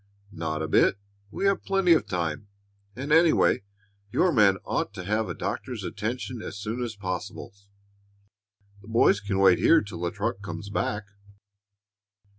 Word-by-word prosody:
"Not 80 -3 -3
a - - -2
bit! 95 - +3 0.3
We 195 - -3
have 195 0 +2
plenty 195 -3 +3
of 160 - +1
time; 85 +1 -3 0.5
and 135 +4 -5
anyway, 165 +1 +4 0.5
your 180 - +3
man 105 -8 +4
ought - - -2
to - - -6
have 105 +4 -1
a - - -4
doctor's - - -4
attention 120 +2 -4
as - - -7
soon 110 +4 -4
as 115 -3 -4
possible. 95 -2 -5 1.3
The 100 - -16
boys 115 -2 +4
can 100 -1 -2
wait 95 -2 +5
here 165 - +5
till 100 -5 -8
the 85 - 0
truck 100 0 -3
comes 100 +1 -7
back." 105 0 -1
105 Hz, 155 wpm, -26 LUFS, 95-125 Hz, 1.3 s, wait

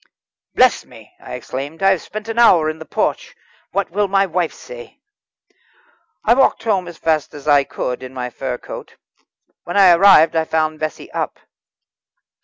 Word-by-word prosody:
"Bless - - +4
me!" - - -17
I - - -8
exclaimed, 145 +7 -7
"I 195 - +5
have 190 - 0
spent 215 +1 -8
an 225 +1 -3
hour 165 -9 +5
in 160 - -12
the 160 - -10
porch. - - -2 0.4
What 195 -1 -2
will 205 +2 0
my 195 0 +2
wife 175 -2 -1
say?" - - -12 1.3
I - - +5
walked 265 -2 +2
home 195 -5 0
as 175 -1 -10
fast 155 -3 -1
as 145 0 -11
I 145 -2 +4
could 125 -1 -4
in 130 0 -9
my 125 -1 -5
fur 130 0 -4
coat. - - -10 0.7
When 175 - -4
I 190 -3 +7
arrived 170 -3 +6
I 160 0 +1
found 155 -1 -1
Bessie 155 0 -5
up. - - -4
165 Hz, 175 wpm, -18 LUFS, 155-195 Hz, 1.3 s, I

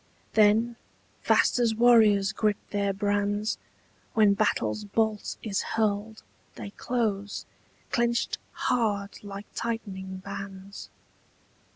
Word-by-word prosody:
Then, 220 +2 +4 0.4
fast - - +3
as 230 -2 +2
warriors 215 -4 +5
grip 210 -1 +1
their 200 -1 +1
brands 205 +1 0 0.6
When 210 -2 +5
battle's 215 +1 0
bolt 215 +1 -1
is 200 -3 -1
hurled, 215 0 -1 0.3
They 205 - -7
close, 205 -4 -2 0.5
clenched 235 -1 +1
hard 210 -5 -1
like 200 0 -7
tightening 195 -5 -4
bands. 195 0 -8
210 Hz, 95 wpm, -27 LUFS, 200-225 Hz, 0.6 s, warriors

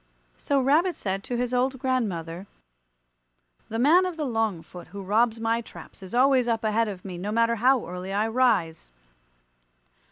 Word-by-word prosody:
So 280 -1 0
Rabbit 310 +7 +2
said 195 0 -3
to 245 - -3
his 250 0 -2
old 260 +2 +1
grandmother, 200 - -2 1.2
"The 225 - -3
man 330 +10 +4
of 355 -3 -6
the 305 - -2
long 225 -8 -1
foot, 180 -1 -12
who 200 +3 -8
robs 225 +4 +1
my 230 +1 0
traps, 225 - -13
is 190 +4 -8
always 255 -1 +4
up 230 -1 0
ahead 220 +1 +1
of 195 -3 -7
me, 180 -3 -6
no 200 +3 -4
matter 230 +1 +2
how 255 +3 +3
early 180 +2 -6
I 210 +3 0
rise. 220 - +1
225 Hz, 170 wpm, -25 LUFS, 195-255 Hz, 1.2 s, man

